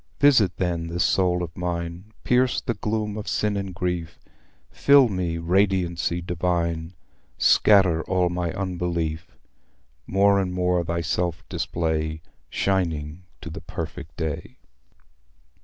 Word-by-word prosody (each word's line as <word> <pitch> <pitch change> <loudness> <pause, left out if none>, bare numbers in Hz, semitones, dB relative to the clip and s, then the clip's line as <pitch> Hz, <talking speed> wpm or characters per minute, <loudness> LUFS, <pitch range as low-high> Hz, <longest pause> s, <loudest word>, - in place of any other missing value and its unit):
Visit, 130 -9 +4
then, 85 -2 -1
this 85 +2 0
soul 90 -2 +2
of 80 -1 -7
mine, 85 +2 -4
Pierce 125 0 +2
the 120 - -2
gloom 105 0 -2
of 105 - -6
sin 105 -1 0
and 100 -1 -3
grief— 90 -2 -3 0.5
Fill 140 -3 +5
me, 90 -4 -2
Radiancy 90 -1 +1
Divine, 85 -1 -1 0.4
Scatter 95 -6 +5
all 90 -1 +2
my 90 -1 -2
unbelief. 85 -4 -3 0.7
More 100 +1 +4
and 90 -2 -1
more 90 -1 +1
thyself 85 0 -2
display, 80 -1 -2 0.3
Shining 85 -3 -1 0.2
to - - -7
the - - -7
perfect 80 0 -7
day." 80 -3 -4
90 Hz, 120 wpm, -24 LUFS, 85-95 Hz, 0.7 s, Fill